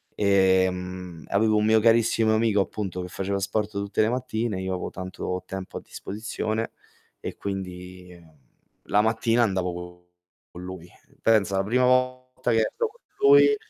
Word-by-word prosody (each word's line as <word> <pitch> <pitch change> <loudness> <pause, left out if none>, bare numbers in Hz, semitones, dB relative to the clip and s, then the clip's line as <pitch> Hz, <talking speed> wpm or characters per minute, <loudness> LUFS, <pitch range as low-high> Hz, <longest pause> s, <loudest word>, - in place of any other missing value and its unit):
Ehm, 95 -4 +1
avevo 110 +2 +3
un 105 - +2
mio 110 0 +5
carissimo 115 0 +3
amico, 110 -2 +2
appunto, 95 -2 -4
che 90 - -5
faceva 100 +2 -2
sport 105 +2 -1
tutte 100 0 -1
le 110 - +3
mattine, 115 -5 -2
io 95 0 -2
avevo 90 - -4
tanto 90 0 -4
tempo 95 -1 -6
a - - -7
disposizione 110 +2 -4 0.5
e - - -6
quindi 90 -2 -7 0.6
la 105 - +3
mattina 115 +1 +2
andavo 95 -4 0 0.8
con 90 - -10
lui. 90 -2 -8 0.4
Pensa, 100 -4 +3
la 95 - +2
prima 125 +5 +2
volta 130 0 +1
che 115 - +3
esco 465 - -1
con 470 - -24 0.2
lui 420 +1 +7
100 Hz, 150 wpm, -25 LUFS, 95-115 Hz, 0.8 s, lui